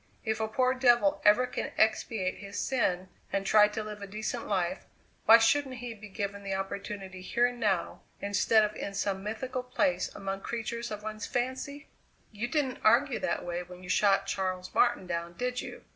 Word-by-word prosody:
If 220 0 0
a 220 - 0
poor 255 +3 +2
devil 255 +3 +3
ever 210 +5 +6
can 250 - -4
expatiate 215 -3 +1
his 200 0 -8
sin 185 -8 0 0.2
and 195 0 -1
try 210 +1 +6
to 215 +1 -4
live 210 -1 -7
a 200 - -6
decent 215 +2 -4
life, 185 -4 -1 0.4
why 225 - +11
shouldn't 260 +3 +2
he 245 -1 -6
be 210 -1 -12
given 200 0 -4
the 195 -1 -3
opportunity 195 -1 -5
here 240 +6 +2
and 245 0 -2
now 200 -6 0 0.2
instead 210 +2 +3
of 210 0 -1
in 200 - -5
some 195 -1 -1
mythical 255 +5 -3
place 185 -8 0
among 195 0 -4
creatures 235 +1 -4
of 210 -1 -6
one's 215 -1 -5
fancy?" 260 +4 -3 0.4
"You 220 +2 -3
didn't 265 -1 -1
argue 245 +4 +4
that 275 - -2
way 175 0 -2
when 180 0 -11
you 180 - -10
shot 195 0 +3
Charles 185 -2 -3
Martin - - +3
down, 170 -1 -3
did 250 +5 -2
you? - - -9
210 Hz, 190 wpm, -30 LUFS, 195-240 Hz, 0.4 s, why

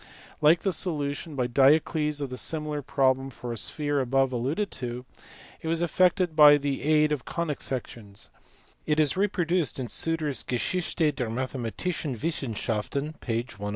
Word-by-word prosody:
Like 155 +3 +5
the 195 - +1
solution 150 -2 -1
by 125 -2 0
Diocles 150 +4 +3
of 140 -2 -4
the - - -4
similar 150 +2 0
problem 135 0 +1
for 120 -2 -6
a - - -5
sphere 145 +4 -1
above 135 0 +1
alluded 145 - -1
to, 125 0 -5 0.6
it - - -6
was 165 0 +1
effected 180 0 +2
by 150 -1 +8
the 140 -1 -2
aid 155 0 +3
of 145 -4 -1
conic 165 -4 -3
sections: 115 -5 -5 0.6
it 150 0 +2
is 150 -3 +3
reproduced 180 -4 0
in 130 -2 -4
Suter 165 +3 -1
s 140 - -2
Geschichte 155 +5 -1
der 125 -4 -2
mathematischen 130 +3 -3
Wissenschaften 135 0 -2
(p. 115 -2 -1
101). 105 -4 -7
145 Hz, 155 wpm, -27 LUFS, 125-160 Hz, 0.6 s, by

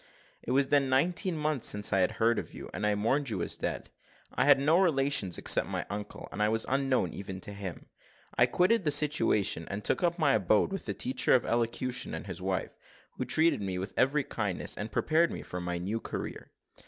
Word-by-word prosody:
"It - - -9
was 135 +1 +2
then 140 -2 +2
nineteen 165 +6 +1
months 150 -5 -1
since 105 0 +2
I 95 - +3
had 95 +4 +2
heard 115 +1 +1
of - - -9
you, - - -9
and 105 - -1
I 105 - +2
mourned 130 +7 0
you 95 -6 -2
as - - 0
dead. - - -4 0.4
I - - +1
had 145 -1 +6
no 155 +5 +3
relations 140 - +2
except - - +3
my - - -3
uncle, 105 0 -6
and 105 - -4
I 105 - +3
was 110 0 +1
unknown 135 - 0
even 95 -1 -7
to 100 - -5
him. 100 -3 -7 0.5
I - - +4
quitted 195 +4 +2
the 155 - +1
situation, 145 - +2
and 100 +2 -5
took - - 0
up 170 -1 +1
my 160 - +3
abode 105 - +2
with 195 - -5
the 100 - -3
teacher 130 +1 +2
of 125 - +1
elocution 120 +2 -1
and - - -7
his - - -7
wife, - - -2 0.5
who 130 - -2
treated 160 +2 +2
me 95 -2 -3
with 95 +3 -5
every 140 +3 +2
kindness, 105 -8 -2
and 105 +1 -6
prepared 165 +2 +2
me - - -6
for 90 - -6
my 90 0 -3
new 100 +6 -3
career. - - -6
125 Hz, 215 wpm, -29 LUFS, 105-145 Hz, 0.5 s, had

